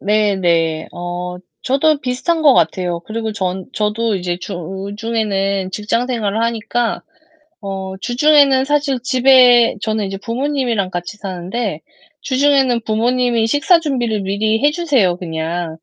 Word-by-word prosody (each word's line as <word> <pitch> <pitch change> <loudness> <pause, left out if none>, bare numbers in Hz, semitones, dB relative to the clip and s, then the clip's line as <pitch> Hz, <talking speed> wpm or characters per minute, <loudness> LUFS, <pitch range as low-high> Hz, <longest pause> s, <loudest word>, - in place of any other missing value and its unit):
네네. 180 -6 +1
어 175 0 -5 0.3
저도 285 +3 +2
비슷한 265 +6 -1
것 285 -4 +6
같아요. 175 +1 0
그리고 220 +4 -4
전 185 -2 -3
저도 215 +1 -1
이제 175 -2 -2
주중에는 195 +1 -3
직장 215 +4 -1
생활을 225 -3 -1
하니까 230 +1 -1 0.6
어 190 -2 -5
주중에는 275 +1 +4
사실 285 -2 0
집에 250 -2 +5
저는 215 -1 -1
이제 195 0 -5
부모님이랑 240 -3 -2
같이 175 +3 -5
사는데 190 -1 -4 0.4
주중에는 270 -2 +2
부모님이 235 +1 +1
식사 290 +8 +3
준비를 240 -8 -1
미리 210 +3 0
해 295 - +5
주세요, 280 - +1
그냥. 165 -1 -4
220 Hz, 290 characters per minute, -17 LUFS, 190-255 Hz, 0.6 s, 것